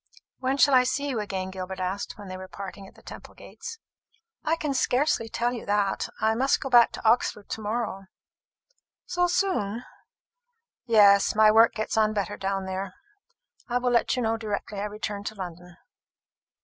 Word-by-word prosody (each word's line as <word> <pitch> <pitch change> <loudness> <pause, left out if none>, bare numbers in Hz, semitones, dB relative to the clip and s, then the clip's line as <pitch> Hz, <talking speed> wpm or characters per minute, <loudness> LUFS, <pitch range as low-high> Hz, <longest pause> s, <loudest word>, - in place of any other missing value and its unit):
"When 265 +1 0
shall 280 +1 +5
I 255 -1 +7
see 270 +3 -1
you 250 -5 -1
again?" 190 -3 -4
Gilbert 190 0 -6
asked, 185 +2 -3
when 205 -2 -10
they 185 - -6
were 185 0 -8
parting 195 0 -8
at - - -18
the - - -19
Temple - - -11
gates. 465 -1 -9 0.7
"I 320 +1 +1
can 300 -4 -2
scarcely 255 -3 +1
tell 240 +2 -1
you 240 - -6
that. 205 -1 0
I 220 0 +2
must 265 +4 +2
go 270 - -5
back 240 -1 +7
to - - -3
Oxford 220 -2 +1
to 220 - -4
morrow." 210 -2 -3 1.0
"So 355 0 +1
soon?" 295 - 0 1.0
"Yes, 205 -4 +5
my 215 0 +6
work 225 +1 +5
gets 215 0 -2
on 215 -1 +3
better 205 0 -2
down 195 0 -2
there. 190 0 -5 0.7
I 245 - +1
will 250 0 0
let 235 +1 +2
you 250 - -1
know 225 0 0
directly 210 -2 -4
I 205 - -2
return 210 -1 -5
to 215 - -4
London." 180 -2 -9
215 Hz, 180 wpm, -26 LUFS, 195-245 Hz, 1.0 s, I